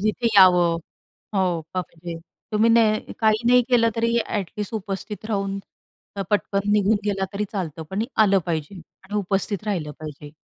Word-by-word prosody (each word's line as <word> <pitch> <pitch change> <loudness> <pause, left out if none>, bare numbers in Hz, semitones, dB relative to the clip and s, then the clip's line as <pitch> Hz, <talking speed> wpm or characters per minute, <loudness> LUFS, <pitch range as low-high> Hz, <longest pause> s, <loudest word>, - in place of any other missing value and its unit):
जिथे 215 +3 0
यावं 180 -3 +6 0.6
हो. 180 -4 +1
बापरे! 170 -2 -5 0.4
तुम्ही 220 +2 +4
नाही 220 -2 +3
काही 215 0 +3
नाही 250 0 +6
केलं, 235 -2 +4
तरी 230 +1 +1
ॲट 200 -5 -3
लिस्ट 210 +2 -4
उपस्थित 205 +1 -5
राहून 195 -2 -1 0.6
अ, 195 - -1
पटकन 205 0 0
निघून 210 +1 +3
गेला 195 -2 0
तरी 205 +1 -1
चालतं, 165 -5 -4
पण 200 +3 -1 0.2
आलं 195 -2 +4
पाहिजे 160 +2 -3 0.3
आणि 205 - -8
उपस्थित 200 +1 -1
राहिलं 170 -8 -2
पाहिजे. 150 -1 -8
200 Hz, 155 wpm, -23 LUFS, 180-215 Hz, 0.6 s, यावं